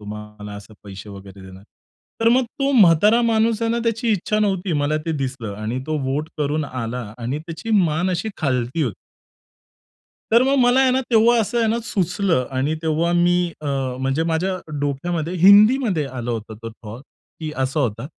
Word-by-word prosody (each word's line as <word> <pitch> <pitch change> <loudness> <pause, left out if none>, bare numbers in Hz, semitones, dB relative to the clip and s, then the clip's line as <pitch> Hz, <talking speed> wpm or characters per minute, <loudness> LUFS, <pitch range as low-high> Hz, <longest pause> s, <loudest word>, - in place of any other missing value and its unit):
तुम्हाला 105 0 -9
असे 100 +2 -12
पैसे 100 0 -10
वगैरे 100 0 -12
देणार." 95 +1 -13 0.6
तर 225 - +4
मग 250 +2 +3 0.2
तो 275 0 +2
म्हातारा 210 - +5
माणूस 225 -1 +1
आहे 230 - +1
ना 235 - 0
त्याची 230 +1 -1
इच्छा 210 +2 -1
नव्हती. 195 -3 0
मला 145 0 0
ते 165 - 0
दिसलं 130 -6 -4
आणि 110 +4 -3
तो 155 0 -1
वोट 145 +4 -2
करून 150 +1 -1
आला 125 -2 -5 0.2
आणि 125 +4 -3
त्याची 165 +6 -7
मान 165 +3 0
अशी 185 +4 -2
खालती 130 0 -1
होती. 120 -9 -2 1.4
तर 230 +2 +6
मग 270 +2 +2
मला 245 +1 +4
आहे 265 -1 +4
ना 260 +1 +2
तेव्हा 235 +1 +5
असं 230 +2 0
आहे 230 - +2
ना 225 +2 +1
सुचलं 180 - 0
आणि 140 +4 0
तेव्हा 160 +2 0
मी 175 0 +3 0.2
अ, 150 - -7 0.3
म्हणजे 135 +4 0
माझ्या 170 +3 0 0.3
डोक्यामध्ये 160 +4 -2
हिंदीमध्ये 205 - +5
आलं 125 -2 -5
होतं 110 -1 -5
तो 115 - -6
थॉट 110 +2 -11 0.4
की 155 -1 -4
असा 135 +3 -1
होता 115 -2 -2
160 Hz, 180 wpm, -21 LUFS, 125-210 Hz, 1.4 s, तर